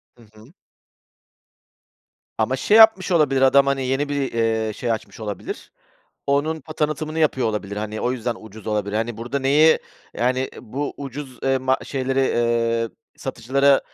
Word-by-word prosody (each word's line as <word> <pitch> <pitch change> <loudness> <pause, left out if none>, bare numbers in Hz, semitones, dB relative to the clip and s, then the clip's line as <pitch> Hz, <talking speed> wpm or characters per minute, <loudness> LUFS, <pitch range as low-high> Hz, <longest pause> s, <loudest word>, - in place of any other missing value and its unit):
Hı 120 - -19
hı. 110 +9 -17 1.8
Ama - - +1
şey 215 - +3
yapmış 220 -4 +6
olabilir 145 -5 +3
adam, 140 +1 +6
hani, 135 -1 0
yeni 135 +3 -1
bir, 140 -2 -1
eee, 110 -1 0
şey 120 +2 -2
açmış 110 0 -5
olabilir. 105 -2 -6 0.6
Onun, 145 +2 0
o, - - -5
tanıtımını 155 +1 -2
yapıyor 140 -6 +2
olabilir. 105 -1 -4
Hani, 110 +1 -4
o 125 - 0
yüzden 120 -1 -2
ucuz 110 0 -12
olabilir. 105 -1 -1
Hani, 115 0 -2
burda 120 +4 -3
neyi, 145 +4 +5 0.4
yani, 130 +2 0
bu 140 +6 -4
ucuz, 135 -2 -7
eee, 135 0 +2
ma 130 0 +1
şeyleri, 135 0 -1
eee, 115 -2 +1 0.3
satıcılara 135 +2 +2
130 Hz, 150 wpm, -22 LUFS, 115-140 Hz, 1.8 s, yapmış